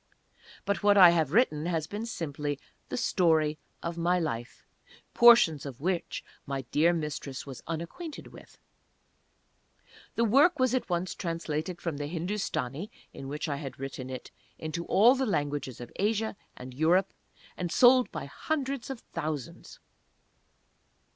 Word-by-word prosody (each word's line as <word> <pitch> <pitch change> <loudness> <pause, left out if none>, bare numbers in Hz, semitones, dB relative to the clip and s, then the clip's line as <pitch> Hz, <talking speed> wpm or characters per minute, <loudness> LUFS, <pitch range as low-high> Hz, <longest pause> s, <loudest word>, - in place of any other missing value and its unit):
But 200 - 0
what 205 -1 +5
I 180 -3 +10
have 160 -5 +1
written 170 -7 +2
has 165 -3 -1
been 210 +7 -5
simply 145 - -4 0.3
the - - -3
Story 160 -9 +2 0.2
of 170 0 -4
my 175 +2 +2
Life, 120 -8 -4 0.5
portions 235 - +7
of 135 -4 -8
which 175 +3 -2 0.2
my 135 -1 -3
dear 160 +4 +4
Mistress 150 -4 -4
was 135 -3 -9
unacquainted 170 - -6
with. - - -15 1.6
The 230 - +2
work 280 - +5
was 255 -2 +2
at 255 - -1
once 175 +1 -1
translated 165 -1 -3
from 165 -4 -3
the 145 0 -3
Hindustani, 170 - -3 0.2
in 135 - -8
which 150 +4 -4
I 145 -2 -2
had 135 -3 -7
written 135 -1 -6
it, 130 -1 -7 0.3
into 160 +2 -4
all 230 +6 +6
the 265 -1 -1
languages 145 - -2
of 120 -1 -9
Asia 220 +2 0 0.2
and 125 0 -9
Europe, 170 +7 +2 0.4
and 175 -2 -3
sold 250 0 +6
by - - -5
hundreds 275 -5 -3
of 265 -4 -6
thousands. 155 -5 -5
170 Hz, 145 wpm, -29 LUFS, 145-205 Hz, 1.6 s, I